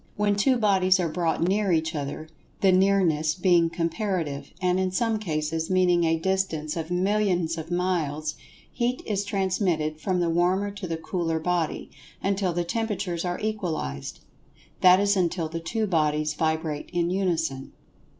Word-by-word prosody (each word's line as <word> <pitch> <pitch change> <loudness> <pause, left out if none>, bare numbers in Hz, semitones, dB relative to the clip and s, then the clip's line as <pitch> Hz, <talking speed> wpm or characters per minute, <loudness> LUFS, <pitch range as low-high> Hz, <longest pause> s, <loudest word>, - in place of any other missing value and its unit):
When 205 0 +1
two 250 +6 +3
bodies 190 -4 +3
are 175 - +1
brought 165 0 -1
near 195 +2 +1
each 160 0 +1
other—the 155 +6 -2
"nearness" 185 -5 +3
being 175 -2 +3
comparative, 165 -4 -2
and, 180 0 +1
in 185 0 +1
some 220 +4 0
cases, 160 -3 -2
meaning 180 -2 +3
a 165 0 +2
distance 165 -4 -1
of 165 -1 -4
millions 180 -2 +1
of 165 0 -7
miles—Heat 175 - -2
is 200 -2 -1
transmitted 185 -6 -1
from 185 -2 0
the 170 -1 +1
warmer 185 +4 +1
to 200 -2 -7
the 165 -1 -2
cooler 165 -1 -2
body, 170 -1 -2 0.3
until 195 -1 +1
the 175 +1 -1
temperatures 195 -3 -2
are 175 -1 -2
equalized—that 180 - -1
is 200 0 +2
until 175 -3 0
the 165 +1 -5
two 215 +7 -2
bodies 155 -4 +1
vibrate 160 -1 -2
in 175 0 0
unison. 165 -8 -1
175 Hz, 145 wpm, -26 LUFS, 160-195 Hz, 0.3 s, two